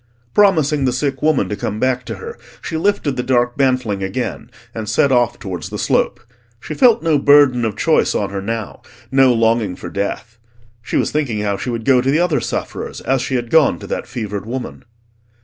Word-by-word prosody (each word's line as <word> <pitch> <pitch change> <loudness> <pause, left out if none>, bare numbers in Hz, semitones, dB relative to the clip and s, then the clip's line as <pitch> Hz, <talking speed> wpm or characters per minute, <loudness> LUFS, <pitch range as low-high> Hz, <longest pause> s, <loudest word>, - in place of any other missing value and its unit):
Promising 155 -9 +3
the 125 - +1
sick 135 +1 -2
woman 150 -10 +2
to 105 - -2
come 105 +1 -4
back 130 0 0
to - - -5
her, 460 0 -8 0.2
she 160 - -6
lifted 160 -6 0
the - - +1
dark 120 -1 +1
bantling 125 -7 0
again, 95 +6 -4 0.2
and 110 -2 -5
set 135 +5 +2
off 120 -2 +2
towards 90 -5 -6
the - - -5
slope. - - 0 0.4
She - - -7
felt 240 -3 +4
no 160 -3 +2
burden 140 -4 +5
of 110 -3 -1
choice 160 - +2
on 100 -2 -1
her 100 -1 -4
now, 115 +1 -5 0.3
no 135 -1 +5
longing 115 -4 +1
for - - -8
death. 110 +3 -4 0.4
She - - -2
was - - 0
thinking 130 -9 -1
how 100 -1 0
she 125 - -5
would 115 -2 -4
go 130 -2 +4
to 130 - -1
the 145 - +3
other 175 -5 +2
sufferers, - - -5
as 135 -1 0
she 130 0 -2
had 120 -2 -3
gone 155 - +4
to - - -10
that - - -4
fevered 105 -4 -5
woman. 125 +1 -6
125 Hz, 205 wpm, -18 LUFS, 110-140 Hz, 0.4 s, burden